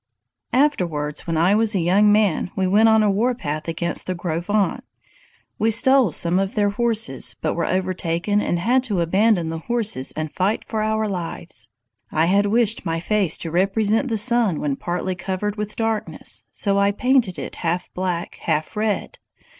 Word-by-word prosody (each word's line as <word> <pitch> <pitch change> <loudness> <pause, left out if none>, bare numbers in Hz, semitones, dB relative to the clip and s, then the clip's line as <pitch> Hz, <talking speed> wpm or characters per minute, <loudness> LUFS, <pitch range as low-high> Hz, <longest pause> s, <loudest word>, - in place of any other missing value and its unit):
"Afterwards, 175 - 0
when 165 -1 -1
I 175 +5 +3
was 220 0 +2
a - - +2
young 195 +5 +4
man, 205 -5 +2
we 190 - 0
went 210 +4 +4
on 220 -1 +4
a 210 - +3
warpath 195 -9 -1
against 170 +1 -3
the 185 - -2
Gros 170 -1 -3
Ventres. 205 -1 +1 0.8
We 220 - +2
stole 250 -1 +4
some 170 +4 +1
of 195 0 -2
their 205 -1 +2
horses, 225 +1 -1
but - - -1
were - - -2
overtaken 185 +1 0
and 175 - -1
had 240 +9 +2
to 200 -7 -1
abandon 185 0 +2
the 165 0 -4
horses 215 - -1
and 155 -1 -4
fight 195 +4 -1
for 220 -2 -2
our 220 0 0
lives. 170 - -5 0.4
I 160 +1 +2
had 200 +3 +3
wished 225 +1 +2
my 165 0 -2
face 190 -1 +1
to 165 - -5
represent 205 - +1
the 225 -3 -1
sun 220 - +2
when 145 -2 -1
partly 175 +4 -3
covered 190 +3 -3
with 210 0 -5
darkness, 225 -1 -2
so 200 -1 0
I 200 0 +3
painted 245 -3 +1
it - - -7
half 175 +1 -2
black, 180 -2 -3
half 155 +4 -2
red. 210 -1 -2
195 Hz, 180 wpm, -21 LUFS, 170-220 Hz, 0.8 s, young